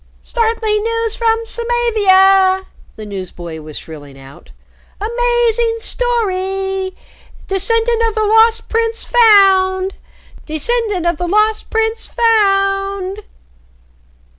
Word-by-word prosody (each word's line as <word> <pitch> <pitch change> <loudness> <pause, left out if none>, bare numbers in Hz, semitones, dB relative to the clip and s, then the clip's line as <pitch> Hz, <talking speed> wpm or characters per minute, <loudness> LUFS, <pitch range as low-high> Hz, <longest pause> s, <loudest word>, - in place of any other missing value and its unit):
"Startling 445 -2 -1
news 455 -1 -2
from 455 0 0
Samavia," 390 -5 +2 0.3
the 215 - -9
newsboy 175 -5 -8
was 155 -1 -8
shrilling 145 -4 -11
out. 135 +1 -15 0.5
"Amazing 470 +1 0
story! 385 -5 -2 0.5
Descendant 455 +4 0
of 440 - -9
the 435 -1 0
Lost 445 +2 +3
Prince 455 0 -1
found! 390 -5 +4 0.5
Descendant 390 +4 -1
of 345 -2 0
the 355 - -3
Lost 425 +3 +1
Prince 445 0 -1
found!" 395 -3 0
420 Hz, 95 wpm, -15 LUFS, 375-455 Hz, 0.5 s, found